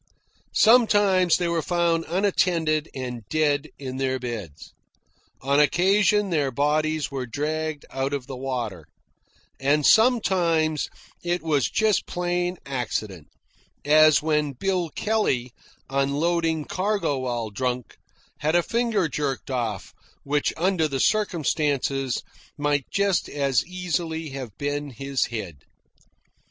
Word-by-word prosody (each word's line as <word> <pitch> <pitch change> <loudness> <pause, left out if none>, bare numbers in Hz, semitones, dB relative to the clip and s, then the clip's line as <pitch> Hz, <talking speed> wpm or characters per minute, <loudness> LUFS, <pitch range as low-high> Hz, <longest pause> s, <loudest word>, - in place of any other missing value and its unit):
Sometimes 205 -6 +5
they 175 - -1
were 170 -1 0
found 170 -1 +1
unattended 170 -4 +1
and 125 -3 -5
dead 155 -1 +1
in 130 -2 -6
their 130 -1 0
beds; 115 - -7 0.7
on 140 +2 +2
occasion 195 +6 +3
their 145 -5 +1
bodies 150 +3 0
were 130 -2 -4
dragged 155 +4 -3
out 135 +1 -2
of 140 -3 -3
the 135 0 -7
water; 120 - -4 0.7
and 140 +2 +2
sometimes 175 - +3 0.3
it 175 -1 -1
was 150 -5 +1
just 220 -3 +1
plain 175 0 -1
accident, 110 - -4 0.6
as 155 0 +6
when 150 -2 +1
Bill 180 +4 -1
Kelley, 140 - -1 0.3
unloading 155 +4 0
cargo 190 -7 -1
while 120 -4 -3
drunk, 125 +2 -3 0.4
had 155 +3 +1
a 175 - +4
finger 230 -5 0
jerked 140 -2 -3
off, 115 -6 -3 0.3
which, 145 +1 0
under 175 -1 +1
the 135 -2 -3
circumstances, 145 - 0 0.3
might 145 -2 0
just 200 -2 +1
as 140 -3 +1
easily 170 -3 -3
have 130 -6 -7
been 145 0 -3
his 135 +2 -2
head. 100 -9 -6
150 Hz, 120 wpm, -24 LUFS, 135-175 Hz, 0.7 s, as